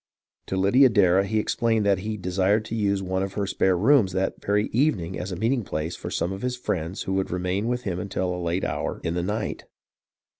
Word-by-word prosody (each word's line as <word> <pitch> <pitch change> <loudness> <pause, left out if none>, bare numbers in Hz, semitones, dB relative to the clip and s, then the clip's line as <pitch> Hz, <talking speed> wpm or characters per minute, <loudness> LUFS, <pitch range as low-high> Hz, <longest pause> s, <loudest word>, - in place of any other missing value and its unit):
To 95 - -2
Lydia 125 +8 +5
Darrah 95 -4 +4
he 110 +2 0
explained 110 0 +1
that 100 -2 +3
he 105 +2 -4
desired 95 +3 +1
to 115 - -4
use 100 -3 0
one 95 0 -1
of 95 0 -3
her 100 -1 -1
spare 95 -1 +1
rooms 110 -2 +4
that 95 +1 -2
very 105 +1 +2
evening 105 - +1
as 90 +2 -5
a - - -3
meeting 115 +6 0
place 80 -1 -3
for - - -6
some 90 - -1
of 95 - -7
his 125 0 -2
friends 90 -7 -3
who 95 - -3
would 95 0 0
remain 90 +4 -1
with 125 0 -1
him 90 -5 -2
until 95 -1 -2
a 90 - -4
late 85 +2 -1
hour - - -2
in 85 - -1
the 90 - -1
night. 105 +4 -3
95 Hz, 225 wpm, -25 LUFS, 90-110 Hz, -, Lydia